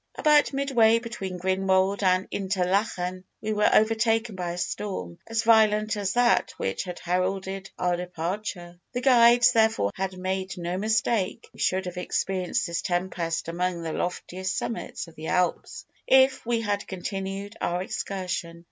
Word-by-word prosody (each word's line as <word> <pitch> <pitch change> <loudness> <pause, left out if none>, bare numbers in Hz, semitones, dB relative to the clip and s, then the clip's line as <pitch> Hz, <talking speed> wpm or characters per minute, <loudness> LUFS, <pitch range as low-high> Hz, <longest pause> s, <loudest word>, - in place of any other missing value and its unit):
"About 300 -1 +4
midway 255 -5 +3
between 230 -6 -5
Grindelwald 190 +2 +1
and 185 0 +2
Interlachen, 185 -1 -1 0.2
we 215 0 -2
were 210 0 +3
overtaken 225 +1 +2
by 175 -2 -3
a - - -7
storm 175 - -4
as 225 0 -1
violent 215 -1 +4
as 200 -2 -1
that 245 0 +3
which 95 - -2
had 180 -1 -6
heralded 190 +2 -2
our 180 -1 +1
departure. 175 0 -5
"The 245 - -2
guides, 245 -2 +6
therefore, 220 - +2
had 190 -1 -4
made 190 +1 -3
no 175 0 -3
mistake. 215 -1 0
We - - -17
should 190 0 +1
have 180 0 -6
experienced 185 0 -1
this 170 -1 -2
tempest 175 -2 -2
among 175 0 -2
the 160 -1 -3
loftiest 185 +1 -3
summits 230 - -4
of 165 - -14
the 160 +1 -8
Alps, 180 -1 -1 0.2
if 265 0 +5
we 235 -1 +1
had 205 -2 -2
continued 195 +2 -5
our 175 +1 -1
excursion. 185 -5 -4
190 Hz, 150 wpm, -26 LUFS, 180-220 Hz, 0.2 s, guides